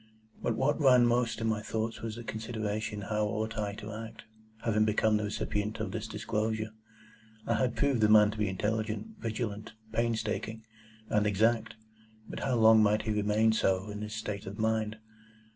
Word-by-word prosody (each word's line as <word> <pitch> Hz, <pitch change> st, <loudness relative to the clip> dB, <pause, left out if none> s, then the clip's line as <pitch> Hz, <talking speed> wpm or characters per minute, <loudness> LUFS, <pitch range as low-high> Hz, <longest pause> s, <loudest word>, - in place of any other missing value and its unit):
But 115 Hz, -, 0 dB
what 135 Hz, +6 st, +1 dB
ran 125 Hz, -3 st, +6 dB
most 120 Hz, -1 st, +1 dB
in 115 Hz, -, 0 dB
my 110 Hz, -1 st, 0 dB
thoughts 110 Hz, +1 st, -3 dB
was 110 Hz, -1 st, -4 dB
the 120 Hz, -, -7 dB
consideration 110 Hz, -2 st, -3 dB
how 105 Hz, +1 st, -1 dB
ought 110 Hz, +2 st, -2 dB
I 105 Hz, -2 st, -2 dB
to 105 Hz, +1 st, -7 dB
act, 110 Hz, +1 st, -8 dB, 0.4 s
having 110 Hz, -2 st, +2 dB
become 110 Hz, 0 st, +3 dB
the 105 Hz, -, -2 dB
recipient 105 Hz, +1 st, -2 dB
of 110 Hz, -, -3 dB
this 110 Hz, -1 st, -4 dB
disclosure? 110 Hz, 0 st, -2 dB, 0.7 s
I 115 Hz, -, +1 dB
had 120 Hz, +2 st, +1 dB
proved 140 Hz, -5 st, +1 dB
the 105 Hz, -, +5 dB
man 105 Hz, -1 st, +7 dB
to 110 Hz, -, -8 dB
be 105 Hz, -2 st, +1 dB
intelligent, 110 Hz, -, -2 dB
vigilant, 110 Hz, -1 st, -4 dB, 0.2 s
painstaking, 110 Hz, -1 st, -1 dB, 0.4 s
and 105 Hz, 0 st, +2 dB
exact; 110 Hz, +3 st, +2 dB, 0.5 s
but -, -, -6 dB
how 130 Hz, -2 st, 0 dB
long 110 Hz, -1 st, +7 dB
might 105 Hz, 0 st, +3 dB
he 110 Hz, -, -1 dB
remain 105 Hz, +1 st, +2 dB
so, 95 Hz, -1 st, +1 dB
in 105 Hz, 0 st, -6 dB
his 105 Hz, 0 st, -5 dB
state 105 Hz, -2 st, -5 dB
of 100 Hz, +1 st, -6 dB
mind? 110 Hz, -1 st, 0 dB
110 Hz, 175 wpm, -30 LUFS, 105-115 Hz, 0.7 s, man